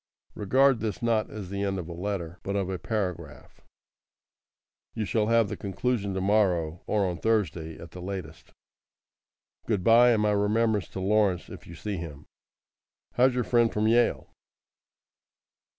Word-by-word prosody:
Regard 130 +4 +3
this 110 0 -4
not 115 -2 +1
as 100 -4 -8
the 100 0 -3
end 100 -1 -1
of 90 -3 -5
a 85 - -6
letter, 90 -1 -4
but 100 +3 -3
of 95 -2 -1
a 95 - -4
paragraph. 100 -6 -5 1.3
You 110 - -2
shall 105 +1 0
have 115 -1 +3
the - - -4
conclusion 100 0 -2
to 95 - -1
morrow, 90 -5 +1
or 105 -2 +1
on 90 -3 -3
Thursday 90 -8 -1
at 85 -1 -11
the 90 - -9
latest. 90 -4 -7 1.2
Goodbye, 115 +3 +5
and 105 -2 +1
my 105 - +2
remembrance 105 0 +1
to - - -7
Lawrence 100 -2 +1
if - - -11
you 85 - -10
see 105 +1 -4
him. 75 -4 -8 0.9
How's 125 +1 +3
your 125 - +1
friend 120 -1 +2
from 105 +1 0
Yale? 120 +1 +2
100 Hz, 155 wpm, -27 LUFS, 90-110 Hz, 1.3 s, Goodbye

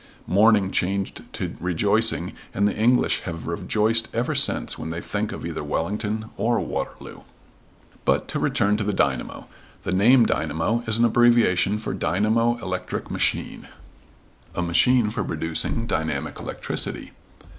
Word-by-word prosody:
Mourning 100 +1 +4
changed 95 +1 -1
to - - -4
rejoicing 100 +6 +1 0.2
and 100 +1 +3
the 105 - -1
English 120 +4 +3
have 85 -2 -6
rejoiced 110 +6 +1
ever 115 +2 0
since - - +1
when 80 - -6
they 80 +1 -4
think 105 +4 -3
of - - -6
either - - -4
Wellington 105 +5 -2
or 120 0 +1
Waterloo. - - -5 0.8
But - - +1
to - - -2
return 105 +1 +1
to 110 - -1
the 105 0 -1
dynamo. 70 -7 -1 0.4
The - - -2
name 115 +6 +5
dynamo 80 +11 0
is 110 0 +4
an 120 - +4
abbreviation 115 -4 +3
for 110 - -4
dynamo 110 +6 +1
electric 90 -1 -4
machine. - - -1 0.9
A 90 - -1
machine 105 +7 +3
for 105 -2 -2
producing 80 +7 -2
dynamic 80 -8 -2
electricity. - - -4
105 Hz, 140 wpm, -24 LUFS, 90-115 Hz, 0.9 s, name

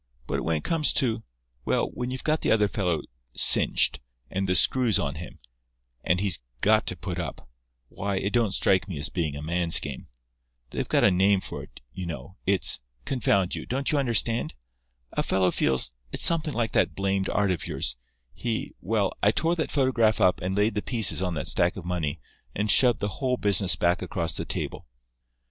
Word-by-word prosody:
But - - -3
when 80 -1 0
it 75 - -7
comes 160 -3 +1
to—well, - - -2
when 125 0 -4
you've 130 -1 -6
got 155 0 0
the - - 0
other 105 -2 +3
fellow 90 -7 -2 0.3
cinched, - - +5 0.3
and 95 0 -2
the 90 - +2
screws 120 -1 +4
on 70 -1 -2
him, 80 +4 -9 0.7
and 90 - +1
he's 95 -5 0 0.2
got - - +3
to - - -2
put - - -5
up—why, - - -7
it 100 +2 -2
don't 115 -5 +1
strike 95 0 +2
me 90 -6 -6
as 70 - 0
being 80 -5 -3
a 70 - -7
man's 85 +1 +3
game. 70 -3 -7 0.6
They've - - -4
got - - +2
a 100 - +5
name 95 +2 +3
for - - -7
it, - - -15
you 90 -2 -6
know; 75 +1 -8
it's—confound 90 - +1
you, - - -5
don't 135 +2 -1
you 150 - +1
understand? 115 - 0 0.6
A - - -1
fellow 95 -1 +1
feels—it's - - 0
something 160 -3 +3
like 115 -1 -1
that - - +1
blamed 95 0 -1
art 100 -2 +1
of 85 -5 -3
yours—he—well, 60 - -4
I 105 - +4
tore 165 +10 +1
that 160 - -3
photograph 120 -6 +2
up 90 - +2
and 95 +2 -3
laid 105 +1 +2
the 105 - -2
pieces 110 -6 +2
on 90 -2 -2
that - - -4
stack 85 +1 +1
of 90 - -8
money 85 -5 -3 0.4
and 105 +1 0
shoved 125 0 +4
the 100 - 0
whole 130 -2 0
business 100 -3 +2
back 90 +2 0
across 85 -2 -3
the - - -3
table. - - -5
95 Hz, 185 wpm, -25 LUFS, 80-115 Hz, 0.7 s, cinched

